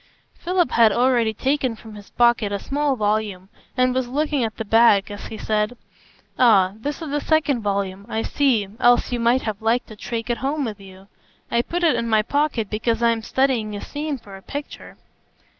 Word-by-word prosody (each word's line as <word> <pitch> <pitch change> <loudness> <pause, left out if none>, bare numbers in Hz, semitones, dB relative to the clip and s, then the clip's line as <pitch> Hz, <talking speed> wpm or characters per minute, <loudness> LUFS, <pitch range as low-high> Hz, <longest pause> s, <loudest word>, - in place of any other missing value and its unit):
Philip 355 0 0
had 230 -2 +5
already 240 0 +2
taken 260 +1 -1
from 220 0 -13
his 205 -1 -12
pocket 235 -4 +2
a 200 - -1
small 285 +5 -1
volume, 210 -4 -2 0.3
and 255 0 +3
was 260 -1 -1
looking 290 +1 0
at 220 -1 -3
the 225 - -4
back 215 -2 +4
as 205 - -7
he 220 - -8
said: 215 +3 -1 0.6
"Ah, 200 -7 +5
this 290 +8 -5
is 305 - -6
the 295 0 -1
second 300 -6 +1
volume, 200 -1 -3
I 220 +1 -2
see, 250 -8 +1
else 245 +1 +3
you 245 - -1
might 235 +3 +2
have 215 -2 -4
liked 230 +3 +1
to 215 - -10
take 230 +2 -4
it 235 - -2
home 280 +1 -1
with 215 -3 -6
you. 190 0 -14 0.4
I 235 - +3
put 345 +8 -4
it 330 - +4
in 235 - -2
my 215 -1 +3
pocket 285 -4 0
because 225 +3 -1
I 235 - +5
am 230 -1 -2
studying 235 -4 0
a 205 - -6
scene 295 -1 -4
for 205 -5 -13
a 195 - -12
picture." 285 +7 -8
235 Hz, 205 wpm, -22 LUFS, 210-265 Hz, 0.6 s, had